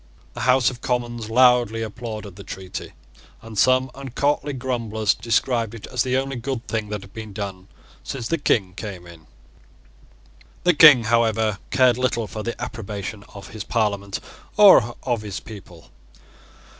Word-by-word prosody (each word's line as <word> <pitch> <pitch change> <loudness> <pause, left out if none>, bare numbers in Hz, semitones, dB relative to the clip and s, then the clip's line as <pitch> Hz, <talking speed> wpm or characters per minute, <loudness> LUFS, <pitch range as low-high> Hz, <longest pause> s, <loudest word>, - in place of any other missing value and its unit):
The - - -8
House 125 0 +4
of 120 -1 -12
Commons 120 -3 -2
loudly 120 -2 +4
applauded 110 -3 -7
the 100 - -10
treaty; 95 -1 -8 0.5
and 115 -1 -10
some 130 +4 +3
uncourtly 140 +2 -1
grumblers 115 -5 -1
described 115 0 0
it 115 - -9
as 125 -2 -2
the 130 0 +1
only 135 0 -2
good 120 0 -4
thing 110 -2 -3
that 105 -1 -4
had 95 0 -15
been 110 -2 -8
done 95 -2 -6 0.4
since 125 -5 -5
the 165 - -1
King 95 -9 +1
came 95 -3 -7
in. 85 -2 -15 1.4
The 180 - +4
King, 145 -6 +8
however, 110 -2 +1
cared 125 -2 +3
little 120 -3 0
for 110 +1 -6
the 120 +2 -5
approbation 105 -3 -6
of 100 - -10
his 105 -1 -7
Parliament 100 -4 -1 0.4
or 160 - +7
of 120 -4 -1
his 100 -2 -5
people. 95 -6 -13
115 Hz, 155 wpm, -22 LUFS, 105-125 Hz, 1.4 s, King